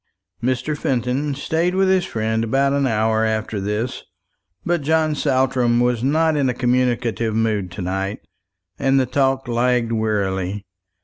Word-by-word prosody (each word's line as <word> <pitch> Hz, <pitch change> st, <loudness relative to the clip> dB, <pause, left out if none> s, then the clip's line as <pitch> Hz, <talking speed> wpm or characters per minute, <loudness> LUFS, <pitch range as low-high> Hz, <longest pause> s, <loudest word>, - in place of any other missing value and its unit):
Mr. 130 Hz, +4 st, -1 dB
Fenton 135 Hz, +2 st, -1 dB
stayed 165 Hz, +5 st, -1 dB
with 190 Hz, 0 st, +3 dB
his 190 Hz, -1 st, +2 dB
friend 110 Hz, -5 st, -1 dB
about 135 Hz, +4 st, +1 dB
an 140 Hz, -1 st, +1 dB
hour 110 Hz, -1 st, +1 dB
after 110 Hz, -2 st, -1 dB
this; 105 Hz, +5 st, -2 dB, 0.6 s
but 175 Hz, -2 st, +1 dB
John 155 Hz, +1 st, +1 dB
Saltram 130 Hz, -4 st, +1 dB
was 120 Hz, -1 st, +1 dB
not 160 Hz, +3 st, +2 dB
in 140 Hz, -3 st, +1 dB
a 125 Hz, -, -2 dB
communicative 120 Hz, -3 st, 0 dB
mood 110 Hz, -4 st, 0 dB
to 100 Hz, -, -5 dB
night, 95 Hz, +2 st, -3 dB, 0.6 s
and 135 Hz, 0 st, +3 dB
the 130 Hz, -, +2 dB
talk 135 Hz, 0 st, 0 dB
lagged 120 Hz, 0 st, +1 dB
wearily. 100 Hz, -3 st, -1 dB
125 Hz, 145 wpm, -21 LUFS, 110-140 Hz, 0.6 s, with